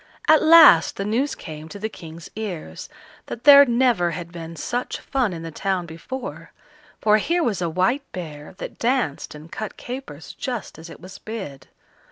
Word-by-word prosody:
At 310 -1 +6
last 315 - +7
the 195 - -4
news 250 +7 0
came 155 -1 -9
to 205 - -8
the 215 +2 -3
King's 165 -6 -11
ears, 180 - -6 0.4
that 235 - -7
there 285 -1 +9
never 240 -8 +2
had 170 -1 -8
been 165 -1 -8
such 240 +10 -3
fun 260 -6 -1
in 165 -2 -7
the 165 - -6
town 190 +1 -2
before, 235 +11 -8 0.5
for 215 0 +4
here 340 +10 0
was 205 - -1
a 170 - 0
white 240 - 0
bear 155 -2 -8
that - - -8
danced 235 - -1
and 155 +2 -12
cut 215 -2 -6
capers 245 - -8
just 245 - -5
as 165 +1 -11
it - - -12
was 185 +2 -11
bid. 190 -12 -8
195 Hz, 180 wpm, -22 LUFS, 165-245 Hz, 0.5 s, there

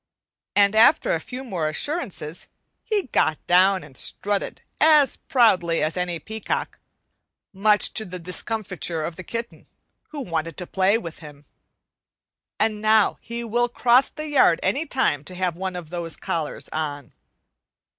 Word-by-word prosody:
and 205 +1 +4
after 285 - +5
a - - 0
few 255 +1 -7
more 175 -11 -2
assurances 180 - -4 0.4
he 425 -3 0
got 155 - +2
down 185 0 +4
and 145 -3 -15
strutted 200 +8 -2 0.2
as 305 -3 +5
proudly 185 -10 +2
as 155 +1 0
any 180 -1 -2
peacock; 220 +5 -4 0.7
much 205 +2 +3
to 220 - -2
the 185 -2 -7
discomfiture 180 -2 -2
of 165 +1 -4
the 185 - -8
kitten, 230 +4 -6 0.4
who 305 - -7
wanted 165 - -3
to 180 - -4
play 190 +4 +2
with 170 -7 -8
him. 145 -2 -13 1.1
And 215 -1 0
now 215 -1 +3
he 235 +1 -6
will 240 +1 0
cross 245 +2 +4
the 305 0 -7
yard 270 - +4
any 275 - 0
time 205 - 0
to 180 - -9
have 180 -2 -1
one 185 +1 -4
of 170 -3 -8
those 170 -3 -3
collars 165 -5 -4
on. 145 -4 -4
190 Hz, 150 wpm, -23 LUFS, 165-230 Hz, 1.1 s, after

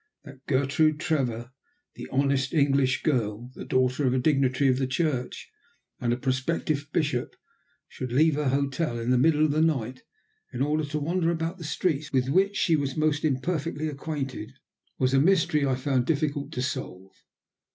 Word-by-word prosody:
That 140 -3 -13
Gertrude 145 +3 +2
Trevor, 125 -7 -1 0.4
the - - -9
honest 140 +1 +1
English 140 -3 +2
girl, 120 -4 -1
the - - -8
daughter 130 +2 +1
of 125 - +2
a - - +2
dignitary 135 0 +2
of 130 0 +2
the 130 - 0
Church 130 -3 -2 0.5
and 120 - 0
a 120 - +1
prospective 140 +3 -1
bishop, 145 -7 -1 0.5
should 125 -2 -6
leave 155 +5 +4
her 145 -1 0
hotel 140 0 -1
in 115 +1 -1
the 125 - +4
middle 155 +2 +4
of 155 - +1
the 155 +2 +1
night 130 -6 0 0.5
in 125 +2 -1
order 155 +2 0
to 150 +1 -3
wander 165 +3 0
about 170 +1 -3
streets 155 -1 -1
with 130 -1 +1
which 195 +6 +2
she 165 - +3
was 140 -2 -2
most 155 -1 +1
imperfectly 155 +2 -1
acquainted, 140 -5 -5 0.4
was 130 0 +1
a 135 - +5
mystery 155 -4 +3
I 130 - +1
found 130 -1 0
difficult 145 -2 -1
to 125 - -2
solve. 95 -7 -5
140 Hz, 170 wpm, -26 LUFS, 130-155 Hz, 0.5 s, a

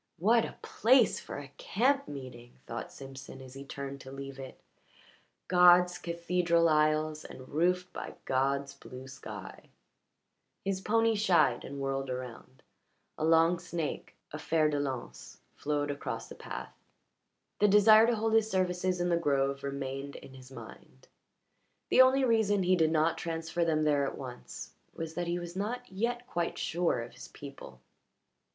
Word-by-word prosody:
"What 225 +6 +4
a - - -8
place 245 0 +4
for - - -7
a 140 -1 -9
camp 275 +6 +1
meeting!" 125 -4 -9
thought 115 - -6
Simpson 135 0 -10
as 130 -1 -11
he 135 +1 -8
turned 140 0 -7
to 130 - -10
leave 135 0 -8
it. 130 -1 -9 0.9
"God's 180 0 +6
cathedral 170 0 +1
aisles, 155 0 +2
and 130 0 -11
roofed 180 +3 0
by - - -6
God's 140 +1 0
blue 130 0 -11
sky." 110 -7 -9 1.0
His 195 -1 -1
pony 225 +2 +2
shied 180 - +3
and 140 0 -7
whirled 135 0 -2
around, 125 0 -7 0.5
a - - -4
long 165 +2 +4
snake 170 -3 -4 0.2
a 150 - -6
fer 155 -1 +2
de 145 -1 -1
lance 130 -4 -5 0.2
flowed 145 -1 -1
across 140 - -5
the - - -10
path. - - -7 0.9
The 210 - +5
desire 215 +2 +7
to 240 - +2
hold 220 0 0
his 220 -1 +4
services 185 -1 0
in 175 0 0
the 170 - +3
grove 140 -3 +1
remained 140 0 -4
in 135 - -11
his 130 0 -13
mind; - - -13 0.8
the - - +7
only 260 +1 +5
reason 220 -5 +3
he 185 +1 +4
did 160 -3 +3
not 160 +1 +2
transfer 165 +1 -2
them 155 -2 +1
there 145 -2 +2
at - - -6
once 125 -2 -8 0.2
was 165 -1 -5
that 175 +1 -3
he 170 +1 0
was 175 0 -7
not 240 +6 -3
yet 240 +5 -2
quite 170 -8 -2
sure 170 -8 0
of 120 - -11
his - - -11
people. 140 - -11
160 Hz, 160 wpm, -31 LUFS, 135-185 Hz, 1.0 s, desire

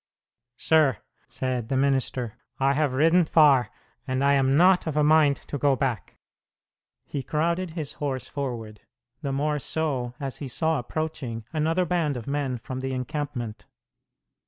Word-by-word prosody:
"Sir," 155 - +3 0.3
said 125 -3 -3
the 135 - +1
minister, 130 -4 0 0.3
"I 135 +1 +3
have 145 -2 +1
ridden 165 +5 +5
far, 145 -7 +5 0.4
and 130 +1 0
I 140 0 +4
am 135 0 +3
not 180 +1 +5
of 155 -2 -2
a 150 - +4
mind 150 -2 +5
to 145 - -5
go 140 -1 +3
back." 125 -9 -3 0.9
He 140 - -4
crowded 170 +6 -1
his 150 -4 -4
horse 130 -3 -2
forward, 115 -7 -5 0.4
the 140 -3 -2
more 150 +2 0
so 135 -5 -2
as 135 -2 -4
he 140 - -6
saw 160 +4 0
approaching 125 -4 -4
another 165 +3 +1
band 165 -6 0
of 115 - -7
men 140 -3 -2
from 130 +2 -6
the 130 0 -3
encampment. 125 -4 -4
140 Hz, 155 wpm, -26 LUFS, 130-155 Hz, 0.9 s, ridden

